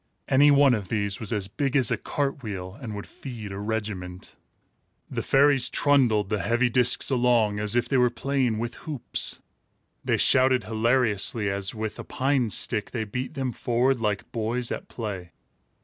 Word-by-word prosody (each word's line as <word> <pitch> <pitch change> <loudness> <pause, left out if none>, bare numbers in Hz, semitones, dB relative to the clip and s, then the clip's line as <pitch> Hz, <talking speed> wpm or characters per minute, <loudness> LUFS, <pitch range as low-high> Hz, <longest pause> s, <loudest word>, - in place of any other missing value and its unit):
Any 140 +2 +5
one 140 -2 +5
of 105 -5 -2
these 100 -1 -1
was 110 - -1
as 105 -4 -1
big 140 +6 -2
as 130 -5 +5
a - - +3
cart 140 -1 -3
wheel, 95 -4 -6
and 110 -5 -6
would 100 - -6
feed 115 -7 -9
a 95 - -6
regiment. 100 -4 -5 0.8
The - - -2
fairies 135 -2 +4
trundled 120 -8 +2
the 105 - 0
heavy 120 +6 +1
discs 125 +2 +3
along, 120 -5 +2
as 105 +1 -1
if 120 0 +1
they 135 - +1
were 125 -1 +4
playing 125 -1 -1
with 115 +1 -3 0.2
hoops. 145 -6 -2 0.6
They - - +1
shouted 130 -1 +3
hilariously, 110 -2 0
as, 100 +2 -2
with 110 -1 -5
a - - -5
pine 130 -3 0
stick, 105 +1 -1
they 115 -3 -3
beat 125 +7 -5
them 130 -3 -2
forward 125 +2 0
like 105 -2 -2
boys 115 +2 -2
at - - -5
play. 95 -7 -6
115 Hz, 175 wpm, -25 LUFS, 105-130 Hz, 0.8 s, Any